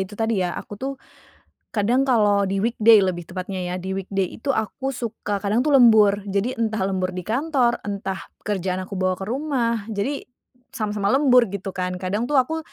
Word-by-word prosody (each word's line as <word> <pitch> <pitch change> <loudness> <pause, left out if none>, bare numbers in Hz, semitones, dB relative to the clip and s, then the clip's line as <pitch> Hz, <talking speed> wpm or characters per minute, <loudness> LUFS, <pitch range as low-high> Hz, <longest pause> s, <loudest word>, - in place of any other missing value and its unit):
itu 205 - -11
tadi 225 -3 0
ya, 180 -1 -1
aku - - -8
tuh 270 +1 -2 0.8
kadang 235 +5 +2
kalau 210 -6 +3
di 195 0 -1
weekday 225 0 +5
lebih 180 -3 -1
tepatnya 185 0 -4
ya, 180 0 -3
di 190 +1 -4
weekday 195 -1 -1
itu 275 +5 -1
aku 265 +4 -2
suka 220 -4 -4
kadang 215 +5 +1
tuh 300 - +1
lembur. 215 -4 +6
Jadi 200 +5 0
entah 220 -3 0
lembur 185 -1 -1
di 180 - -4
kantor, 250 - +1
entah 195 -1 -3 0.2
kerjaan 185 -2 -2
aku 195 0 -6
bawa 185 0 +1
ke 190 - -7
rumah, 235 -4 -1
jadi 225 +6 -2 0.5
sama-sama 210 -2 -2
lembur 250 -5 +5
gitu 200 -1 -5
kan. 180 -1 -3
Kadang 195 +6 -2
tuh 295 - -1
aku 295 +5 +2
210 Hz, 185 wpm, -23 LUFS, 190-240 Hz, 0.8 s, lembur